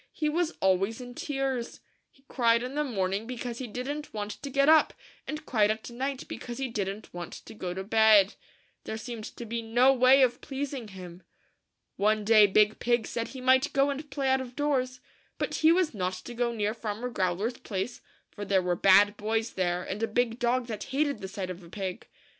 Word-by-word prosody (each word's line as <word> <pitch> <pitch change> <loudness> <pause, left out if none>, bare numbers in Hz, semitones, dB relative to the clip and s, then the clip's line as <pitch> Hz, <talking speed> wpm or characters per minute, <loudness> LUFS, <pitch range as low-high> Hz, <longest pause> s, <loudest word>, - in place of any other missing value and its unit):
He 305 -1 -1
was 335 +2 0
always 195 +4 +2
in 245 -1 -8
tears. 270 -3 -3 0.3
He 270 - -29
cried 235 -2 +2
in 255 +2 -5
the 300 +1 0
morning 200 -4 -2
because 245 -1 -5
he 260 - -4
didn't 270 +5 -5
want 210 0 -3
to 280 - -7
get 275 +1 +2
up; 315 0 +5 0.3
and 305 0 -5
cried 215 -6 +2
at 220 +2 -3
night 265 +2 -4
because 240 -1 -7
he 270 -1 -2
didn't 205 -1 -4
want 175 -1 -7
to - - -11
go 180 -4 -5
to 190 - -4
bed. 215 -1 +5 0.5
There 220 - -4
seemed 225 -1 -7
to 235 - -8
be 230 +1 -3
no 240 +4 +4
way 260 +1 +6
of 245 -1 +1
pleasing 270 -3 -5
him. 185 -3 -10 0.8
One 210 +1 +2
day 215 -1 +7
Big 210 +2 +3
Pig 240 -1 +1
said 230 -1 -3
he 260 - -9
might 260 +1 +3
go 275 +1 +3
and 290 +2 -6
play 270 0 -2
out 265 0 +3
of 250 -1 -9
doors; 255 -3 -1 0.4
but - - -2
he 315 +1 +6
was 345 -3 +2
not 185 -3 -2
to 185 +6 -8
go 240 0 0
near 210 -2 -1
Farmer 225 +2 -4
Growler's 195 +4 -1
place, 200 +4 -4 0.3
for 205 - -7
there 195 -2 +2
were 180 -1 +1
bad 200 +3 +5
boys 220 +2 -1
there, 180 -1 -1
and 200 +4 -5
a 225 - +1
big 235 +1 0
dog 245 +1 +1
that 215 -3 -5
hated 285 +1 0
the 190 - -6
sight 190 -2 -5
of 180 +1 -8
a 170 - -14
pig. 190 +2 -5
230 Hz, 210 wpm, -28 LUFS, 205-260 Hz, 0.8 s, day